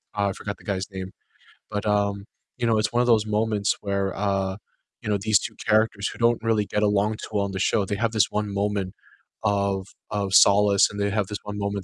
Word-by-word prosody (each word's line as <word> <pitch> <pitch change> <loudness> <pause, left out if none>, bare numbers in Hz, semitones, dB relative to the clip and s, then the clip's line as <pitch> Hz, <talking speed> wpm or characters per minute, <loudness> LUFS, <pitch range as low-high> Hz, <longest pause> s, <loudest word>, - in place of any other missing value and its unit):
oh, 100 -1 +1
I - - -3
forgot 100 -1 -6
the - - -19
guy's 95 -1 -2
name, 95 0 -6 0.6
but, 105 0 -3
um, 100 -1 0 0.3
you 120 - -1
know, 110 -2 +3
it's 105 - 0
one 120 +1 +2
of 125 - +1
those 110 -2 +4
moments 105 -1 +1
where, 100 -1 -1
uh, 95 -1 -1 0.4
you 105 - -5
know, 105 - +2
these 110 0 +4
2 - - -6
characters 105 -2 +2
who - - -10
don't 115 -1 +2
really 110 -2 +1
get 105 - -1
along 105 +1 +2
too - - -7
well 100 -1 +1
on 100 - -4
the 95 - -4
show, 100 +1 +1
they 100 - -2
have 115 +2 0
this 110 -4 +3
one 105 -1 -2
moment 100 -2 -1 0.5
of 100 -2 0 0.2
of 100 -2 -2
solace, 100 0 +6
and 105 - -7
they 100 0 +1
have 100 -2 0
this 105 - -4
one 105 0 -6
moment 100 -1 -2
100 Hz, 235 wpm, -24 LUFS, 100-105 Hz, 0.6 s, solace